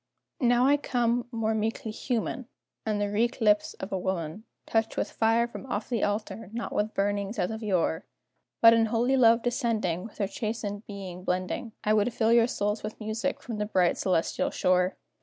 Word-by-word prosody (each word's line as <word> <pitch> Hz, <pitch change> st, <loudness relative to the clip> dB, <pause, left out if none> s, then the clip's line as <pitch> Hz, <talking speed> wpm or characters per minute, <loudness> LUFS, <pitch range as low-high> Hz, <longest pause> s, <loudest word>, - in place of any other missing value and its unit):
Now 245 Hz, -1 st, +4 dB
I 285 Hz, +2 st, +5 dB
come 240 Hz, -3 st, 0 dB
more 225 Hz, -2 st, 0 dB
meekly 220 Hz, 0 st, -2 dB
human, 240 Hz, +2 st, -3 dB, 0.4 s
And 210 Hz, -1 st, 0 dB
the 205 Hz, 0 st, -1 dB
wreak 230 Hz, +5 st, 0 dB
lips 210 Hz, -2 st, +3 dB
of 190 Hz, -, -7 dB
a 190 Hz, -, -1 dB
woman 180 Hz, +2 st, -3 dB, 0.2 s
Touch 225 Hz, 0 st, 0 dB
with -, -, -1 dB
fire 230 Hz, +1 st, +2 dB
from 240 Hz, -, -9 dB
off 210 Hz, -4 st, -3 dB
the 235 Hz, -4 st, 0 dB
altar, 205 Hz, 0 st, -2 dB
not 235 Hz, 0 st, -4 dB
with 215 Hz, +1 st, -1 dB
burnings 200 Hz, +2 st, -1 dB
as 180 Hz, +1 st, 0 dB
of 220 Hz, 0 st, -5 dB
yore; 185 Hz, -4 st, 0 dB, 0.6 s
But 230 Hz, 0 st, +10 dB
in 225 Hz, -1 st, +3 dB
holy 240 Hz, +4 st, +2 dB
love 230 Hz, -2 st, +5 dB
descending, 225 Hz, -, 0 dB
With 225 Hz, -, -11 dB
her 205 Hz, -, +1 dB
chastened 210 Hz, 0 st, -4 dB
being 190 Hz, -3 st, -7 dB
blending, 185 Hz, +5 st, -2 dB
I 215 Hz, -, +3 dB
would 215 Hz, +3 st, +2 dB
fill 225 Hz, 0 st, +3 dB
your 235 Hz, 0 st, +5 dB
souls 210 Hz, -2 st, -1 dB
with 215 Hz, +1 st, -6 dB
music 220 Hz, +5 st, -3 dB
from 230 Hz, -4 st, -5 dB
the 210 Hz, -, 0 dB
bright 185 Hz, -4 st, +2 dB
celestial 180 Hz, -4 st, 0 dB
shore. 180 Hz, 0 st, +1 dB
220 Hz, 190 wpm, -28 LUFS, 200-230 Hz, 0.6 s, But